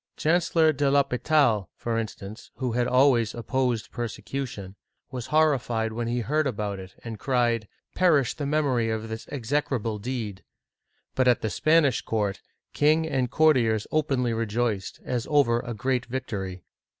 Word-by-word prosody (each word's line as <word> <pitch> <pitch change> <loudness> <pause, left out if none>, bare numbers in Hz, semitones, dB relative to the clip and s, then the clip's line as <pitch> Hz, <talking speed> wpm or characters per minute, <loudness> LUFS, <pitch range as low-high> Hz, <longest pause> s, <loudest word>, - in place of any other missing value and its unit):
Chancellor 165 -1 +3
de 140 0 +1
L'H6pital, 140 -5 +2
for 115 -1 -2
instance, 110 -1 -7
who 130 -2 -2
had 120 +1 0
always 125 -4 +3
opposed 120 -1 -1
persecution, 120 -3 -5 0.4
was 125 -2 -5
horrified 125 -8 +1
when 115 +1 -3
he 120 +1 -1
heard 150 +5 0
about 105 -5 -3
it, 95 0 -11
and 115 -3 -7
cried, 120 -4 +1 0.3
"Perish 155 -9 +3
the 145 -2 -4
memory 140 -6 +1
of 110 0 -3
this 110 0 -6
execrable 120 -4 -1
deed! 110 -4 -5 0.4
" - - -47
But 130 -1 +2
at 120 -2 +4
the 110 - -2
Spanish 155 -5 +3
court, 105 -3 -2 0.3
king 155 +2 +3
and 130 -5 0
courtiers 125 -8 +3
openly 135 -6 +1
rejoiced, 115 -2 -2
as 125 -1 -2
over 135 -6 +3
a 120 -1 -5
great 125 +1 -1
victory. 100 -8 -5
120 Hz, 150 wpm, -26 LUFS, 110-140 Hz, 0.4 s, at